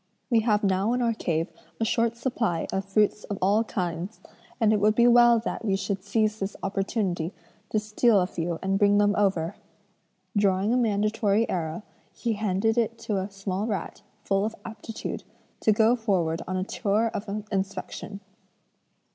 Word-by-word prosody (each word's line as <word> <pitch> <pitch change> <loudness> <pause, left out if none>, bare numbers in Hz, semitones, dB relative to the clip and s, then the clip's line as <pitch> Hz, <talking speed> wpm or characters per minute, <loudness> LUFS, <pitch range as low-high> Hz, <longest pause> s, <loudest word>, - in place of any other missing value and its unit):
We 230 - +5
have 215 -2 +2
now 195 +3 +2
in 250 - 0
our 230 -1 +2
cave 165 -6 -1 0.3
a 225 - +1
short 230 +1 +1
supply 230 -9 -1
of 190 0 -1
fruits 210 +1 +1
of 205 - -4
all 205 +4 +3
kinds, 180 0 -4 0.4
and 220 -2 +4
it 210 - +2
would 215 +1 +3
be 235 - +5
well 240 -1 +7
that 225 +1 -3
we 200 -3 +1
should 195 0 -3
seize 215 +1 0
this 195 +1 -3
opportunity 195 -3 -1 0.4
to - - 0
steal 215 +1 +3
a 180 - +2
few 170 -2 -3
and 195 +1 +1
bring 205 0 +5
them 205 0 +3
over.' 190 -3 +1 0.8
Drawing 200 +1 +2
a - - +3
mandatory 215 -1 +2
arrow, 165 +1 -3 0.3
he 235 -2 -1
handed 215 +2 +1
it 230 0 -1
to 210 -3 -2
a 190 +2 -3
small 195 +1 -3
rat, 200 -2 -4 0.2
full 195 0 +1
of 220 +1 -2
aptitude, 225 0 -6 0.4
to 220 - +3
go 220 +3 +4
forward 180 -8 0
on 185 +1 -2
a 185 - 0
tour 215 +3 0
of 205 +1 -4 0.2
inspection. 195 +1 -4
205 Hz, 170 wpm, -26 LUFS, 190-225 Hz, 0.8 s, well